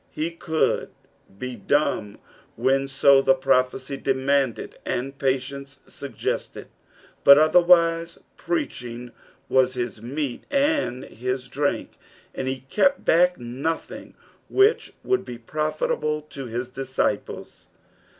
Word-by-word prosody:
He 160 +2 -3
could 160 -1 0 0.5
be 125 +2 -5
dumb 110 -3 0 0.4
when 135 +1 +1
so 135 0 +5
the 135 - +4
prophecy 130 +1 0
demanded 135 -2 0
and 135 +3 -3
pslience 135 +1 -2
EUg - - -9
gested, - - -3 0.6
but 140 0 +9
otherwise, 170 +1 +4 0.2
preaching 125 - -4 0.4
was 130 -1 +2
his 120 -3 -4
meat 135 +2 -4
and 280 - +1
his 125 +2 -4
drink, 140 +3 -2 0.3
and 130 - -4
he 130 0 -3
kept 215 - +1
back 180 +2 +4
nothing; 130 +7 -5 0.3
which 405 +3 +3
would 385 0 +1
be 120 - -8
profitable 155 +3 -2
to 135 -2 -6
his 120 +2 -4
disciples. 130 -5 -3
135 Hz, 110 wpm, -24 LUFS, 125-155 Hz, 0.6 s, but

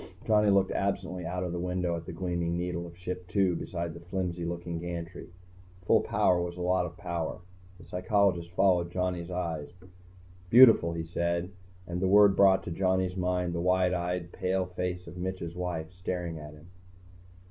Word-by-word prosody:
Johnny 105 -1 +4
looked 100 -1 +3
absently 95 -3 -2
out 90 0 -2
the 85 - -3
window 90 -1 -1
at 80 -1 -7
the - - -5
gleaming 85 -1 -2
needle 85 -1 -3
of 85 0 -13
Ship 90 0 -5
II 95 -3 +3
beside 85 0 -4
the 85 - -9
flimsy 90 0 -3
looking 85 0 -4
gantry. 85 0 -6 0.6
Full - - +4
power 90 -1 +2
was 85 0 -4
a - - -5
lot 90 0 +1
of 85 +1 -12
power. 85 -2 -3 0.4
The - - -14
psychologist 90 -2 +1
followed 90 -2 +2
Johnny's 90 -1 -2
eyes. 85 -5 -3 0.8
"Beautiful," 115 -8 +7
he 85 0 -3
said, 85 +2 -2 0.3
and 90 0 -4
the 95 - +2
word 100 0 +6
brought 95 -1 +5
to - - -6
Johnny's 95 +1 0
mind 90 -1 -1
the 85 - -2
wide 90 0 +2
eyed 90 -1 -2
pale 95 0 -1
face 90 0 -4
of 85 +1 -10
Mitch's 90 -2 -4
wife, 90 -2 -4
staring 90 -2 -4
at 75 0 -9
him. 75 +1 -16
90 Hz, 175 wpm, -29 LUFS, 85-90 Hz, 0.8 s, Beautiful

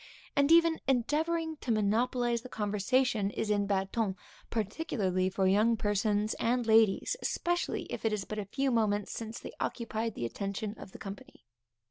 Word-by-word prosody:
And 280 +2 +3
even 330 -1 +5
endeavoring 315 +5 0
to 255 - -3
monopolize 235 +3 +1
the 255 - -10
conversation 210 +1 +1
is 210 +1 -2
in 205 -1 +1
bad 195 -1 0
ton, 215 -5 0 0.3
particularly 205 - -1
for 190 0 0
young 215 +5 +4
persons 210 0 +1
and 245 +1 +1
ladies, 220 -3 +4
especially 350 0 -1
if - - -6
it 225 - +2
is 210 -2 -2
but 215 - -5
a 205 - -3
few 270 +6 0
moments 210 -3 +1
since 225 0 -5
they - - -9
occupied 230 -2 -2
the 120 - -3
attention 200 - -3
of - - -10
the - - -10
company. 195 - -10
220 Hz, 165 wpm, -31 LUFS, 205-250 Hz, 0.3 s, even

